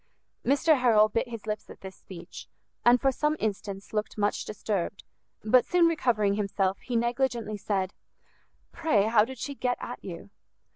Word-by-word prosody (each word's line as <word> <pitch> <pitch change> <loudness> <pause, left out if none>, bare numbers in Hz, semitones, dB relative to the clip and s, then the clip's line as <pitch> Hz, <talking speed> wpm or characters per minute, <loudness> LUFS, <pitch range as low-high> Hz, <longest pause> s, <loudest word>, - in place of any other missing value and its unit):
Mr 290 +3 +3
Harrel 220 -4 +5
bit 230 +4 -1
his 230 -3 -7
lips 215 0 -4
at - - -12
this 190 -1 -9
speech, 175 -2 -11 0.4
and 240 +1 +6
for 270 +1 +3
some 300 +3 0
instants 200 -2 -4
looked 215 0 -2
much 205 0 0
disturbed; 200 -3 -3 0.4
but 240 +4 +5
soon 355 -1 +3
recovering 240 -11 +2
himself, 195 -1 0
he 245 - -5
negligently 235 -2 0
said, 195 -2 -2 0.8
"Pray, 315 -12 +2
how 220 0 +4
did 260 +3 -6
she 280 - -4
get 250 -2 -1
at 245 - -7
you?" 185 +2 -8
220 Hz, 160 wpm, -28 LUFS, 200-255 Hz, 0.8 s, and